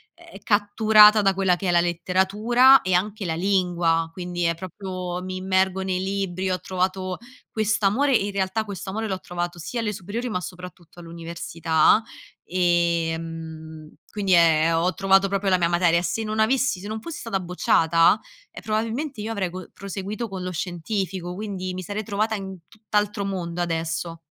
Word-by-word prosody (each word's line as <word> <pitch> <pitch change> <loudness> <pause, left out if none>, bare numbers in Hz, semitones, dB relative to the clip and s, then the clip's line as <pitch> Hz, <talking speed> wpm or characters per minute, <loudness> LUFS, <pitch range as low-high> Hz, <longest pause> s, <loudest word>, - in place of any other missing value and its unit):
ehm, - - -14
catturata 210 0 +5
da 195 -1 +2
quella 190 -2 +2
che 185 +2 -4
è - - +3
la 170 0 +4
letteratura 200 +9 +4
e 185 -1 +1
anche 205 +3 -1
la 165 -2 -1
lingua. 175 -3 +1
Quindi 175 0 -4
è 170 0 +1
proprio 185 0 -6
mi 185 0 -5
immergo 190 0 +1
nei 185 -1 -1
libri, 190 -1 -2
ho 185 0 -1
trovato 185 0 -2 0.3
quest'amore 220 +5 +2
in 205 -2 +1
realtà 195 +2 -1
questo 200 -2 -7
amore 220 +3 -3
l'ho 190 -2 -3
trovato 175 -1 -5
sia 230 +8 -4
alle 210 -2 -2
superiori, 210 +7 -5
ma 180 -5 -2
soprattutto 180 -1 -10
all'università. 165 +1 +1 0.4
Ehm, 165 -3 -2 0.2
quindi 195 -3 0
è 165 -1 +4
ho 175 +3 +1
trovato 195 0 +3
proprio 195 0 -1
la 185 - +4
mia 170 -1 +1
materia. 170 -1 +3
Se 180 +6 -2
non 215 0 -3
avessi 250 -1 +2
se 205 - -7
non 220 +1 -4
fossi 335 +6 -7
stata 215 -5 -2
bocciata, 170 0 +3 0.3
e - - -9
probabilmente 225 +4 -2
io 220 +2 -4
avrei 200 -5 -2
co 185 +1 -9
proseguito 200 +4 -5
con 190 -3 -6
lo 185 - -3
scientifico, 180 +1 -3
quindi 185 -2 -5
mi 185 - -5
sarei 205 +4 -4
trovata 215 +1 -1
in 190 -2 -6
tutt'altro 210 0 -2
mondo 175 -3 -3
adesso. 165 0 -3
185 Hz, 170 wpm, -24 LUFS, 175-205 Hz, 0.4 s, catturata